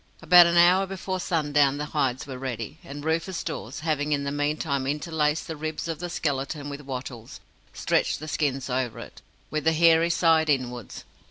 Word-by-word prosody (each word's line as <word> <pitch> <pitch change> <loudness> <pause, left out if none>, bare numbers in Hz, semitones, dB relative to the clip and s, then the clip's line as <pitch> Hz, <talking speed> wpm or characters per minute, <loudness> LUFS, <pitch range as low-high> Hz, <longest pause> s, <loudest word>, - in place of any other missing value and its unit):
About 175 +1 +7
an 170 0 +1
hour 180 +3 +5
before 190 0 -4
sundown 145 -5 +1
the 150 - -3
hides 130 -4 0
were 130 -3 -7
ready, 120 -4 -5
and 145 +2 -8
Rufus 165 +3 -1
Dawes, 130 +7 -6
having 150 -2 0
in 140 -1 -1
the 140 - -2
meantime 145 -1 -1
interlaced 150 +1 -1
the 160 - -5
ribs 155 +2 -4
of 165 -2 -4
the 175 0 -4
skeleton 145 -2 -3
with 140 0 -7
wattles, 125 -4 -7 0.3
stretched - - 0
the 155 - -8
skins 140 -4 -1
over 125 -2 -2
it, 115 - -10 0.3
with 155 0 -2
the 160 - +3
hairy 165 +1 +4
side 160 -2 +3
inwards. 125 -5 -2
150 Hz, 180 wpm, -26 LUFS, 135-165 Hz, 0.3 s, About